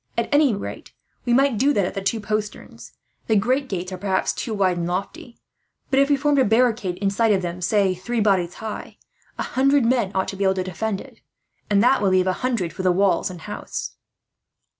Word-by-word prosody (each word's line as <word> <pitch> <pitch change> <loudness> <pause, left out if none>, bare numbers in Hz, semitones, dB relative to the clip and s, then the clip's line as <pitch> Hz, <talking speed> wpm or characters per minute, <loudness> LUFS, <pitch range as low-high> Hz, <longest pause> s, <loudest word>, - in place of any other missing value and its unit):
At - - -1
any 290 -6 +4
rate, 200 - -8 0.3
we 240 - +2
might 270 -4 +3
do 280 +4 +3
that 200 -6 +1
at - - -4
the 195 - -4
two 195 +4 -1
posterns. 215 0 -5 0.3
The 220 - +2
great 255 +7 +1
gates 185 -1 -4
are, 185 - -6
perhaps, 190 -1 0
too 235 - -5
wide 190 -4 +1
and 170 0 -2
lofty; 195 +6 -5 0.5
but 270 - +4
if 275 +1 +3
we 285 - +4
formed 290 0 +2
a - - +5
barricade 225 -4 +2
inside 200 +1 +2
them 175 0 -4
of, - - -6
say, 195 0 +2
three 195 +7 -3
bodies 190 -5 +1
high, 220 -1 -7 0.4
a - - -2
hundred 275 0 +2
men 235 -5 +1
ought 190 - 0
to - - -5
be 200 - -2
able 190 0 +2
to 185 - -1
defend 195 +2 -3
it; - - -15 0.5
and 200 0 +3
that 260 0 +4
will 200 - +3
leave 185 -1 +3
a 185 - +1
hundred 230 -10 -1
for - - -5
the 185 -1 +3
walls 195 +2 +2
and 180 -3 -9
house." 210 +4 -6
205 Hz, 220 wpm, -22 LUFS, 185-240 Hz, 0.5 s, a